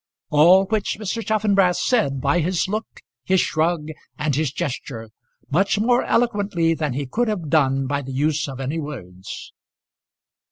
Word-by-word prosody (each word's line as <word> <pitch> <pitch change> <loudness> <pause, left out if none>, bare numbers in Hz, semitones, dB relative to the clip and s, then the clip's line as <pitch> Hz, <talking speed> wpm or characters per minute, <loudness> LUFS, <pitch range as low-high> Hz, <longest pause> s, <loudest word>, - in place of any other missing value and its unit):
All 175 +6 +6
which 210 0 -1
Mr. 220 +2 -3
Chaffanbrass 200 -4 +2
said 140 - +1
by 140 +6 +2
his 175 +3 0
look, 215 +3 -5 0.2
his 190 0 +2
shrug, 160 -1 0 0.3
and 150 -1 -1
his 150 -2 0
gesture, 125 -8 -5 0.4
much 195 +7 +2
more 245 +3 +3
eloquently 205 -8 +1
than 150 -4 -2
he 140 +2 -3
could 235 - -1
have 185 -8 -3
done 135 -3 +2
by 140 +1 -1
the 135 -1 -8
use 145 +3 0
of 135 -2 -7
any 135 +5 -2
words. 95 - -8
160 Hz, 155 wpm, -22 LUFS, 140-200 Hz, 0.4 s, All